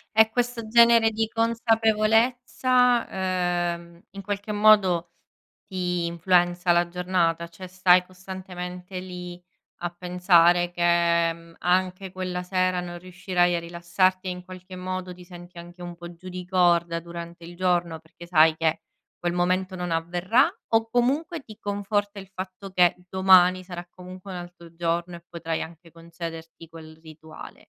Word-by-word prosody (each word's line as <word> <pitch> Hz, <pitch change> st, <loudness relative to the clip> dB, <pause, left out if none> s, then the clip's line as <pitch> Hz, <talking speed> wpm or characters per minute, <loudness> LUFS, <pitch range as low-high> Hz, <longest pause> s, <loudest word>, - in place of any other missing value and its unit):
E 220 Hz, 0 st, +6 dB
questo 240 Hz, -1 st, -2 dB
genere 235 Hz, 0 st, +6 dB
di 220 Hz, 0 st, -1 dB
consapevolezza, 230 Hz, +2 st, +2 dB
ehm, 175 Hz, -2 st, -2 dB
in 195 Hz, 0 st, -8 dB
qualche 205 Hz, +2 st, -4 dB
modo 195 Hz, -5 st, +4 dB, 0.5 s
ti 180 Hz, -2 st, -2 dB
influenza 175 Hz, +1 st, +2 dB
la 175 Hz, 0 st, +3 dB
giornata? 175 Hz, -2 st, 0 dB
Cioè 170 Hz, +2 st, -11 dB
stai 180 Hz, 0 st, +4 dB
costantemente 185 Hz, 0 st, -8 dB
lì 180 Hz, -1 st, -8 dB, 0.3 s
a 175 Hz, -, -3 dB
pensare 175 Hz, 0 st, +3 dB
che, 170 Hz, -1 st, +2 dB
mhmm, 165 Hz, 0 st, -16 dB
anche 185 Hz, +1 st, 0 dB
quella 185 Hz, -1 st, -4 dB
sera 185 Hz, 0 st, 0 dB
non 175 Hz, -1 st, -6 dB
riuscirai 180 Hz, -1 st, 0 dB
a -, -, 0 dB
rilassarti 175 Hz, +2 st, 0 dB
e -, -, -1 dB
in 180 Hz, 0 st, -8 dB
qualche 185 Hz, 0 st, -11 dB
modo 185 Hz, 0 st, -5 dB
ti 180 Hz, -, -13 dB
senti 175 Hz, 0 st, -13 dB
anche 175 Hz, +1 st, -11 dB
un 175 Hz, -1 st, -7 dB
po' 175 Hz, 0 st, -10 dB
giù 185 Hz, +2 st, -11 dB
di 180 Hz, 0 st, -7 dB
corda 175 Hz, -2 st, +2 dB
durante 170 Hz, 0 st, -9 dB
il 175 Hz, +1 st, -10 dB
giorno, 175 Hz, -2 st, 0 dB
perché 165 Hz, +2 st, -15 dB
sai 160 Hz, -2 st, +5 dB
che 160 Hz, 0 st, 0 dB, 0.4 s
quel 175 Hz, 0 st, -2 dB
momento 185 Hz, +1 st, 0 dB
non 180 Hz, -1 st, -4 dB
avverrà 175 Hz, +9 st, +2 dB, 0.3 s
o 225 Hz, 0 st, +3 dB
comunque 290 Hz, +8 st, 0 dB
ti 215 Hz, -4 st, -14 dB
conforta 205 Hz, 0 st, -2 dB
il 195 Hz, 0 st, -12 dB
fatto 185 Hz, +1 st, -8 dB
che 180 Hz, -2 st, +4 dB, 0.2 s
domani 185 Hz, -1 st, +5 dB
sarà 175 Hz, -1 st, -8 dB
comunque 185 Hz, +2 st, -11 dB
un 180 Hz, -, -5 dB
altro 175 Hz, -1 st, -11 dB
giorno 170 Hz, +1 st, -2 dB
e 170 Hz, 0 st, -13 dB
potrai 165 Hz, -1 st, -4 dB
anche 165 Hz, 0 st, -13 dB
concederti 165 Hz, -1 st, -9 dB
quel 160 Hz, -1 st, -13 dB
rituale? 160 Hz, 0 st, -12 dB
180 Hz, 150 wpm, -25 LUFS, 170-190 Hz, 0.5 s, E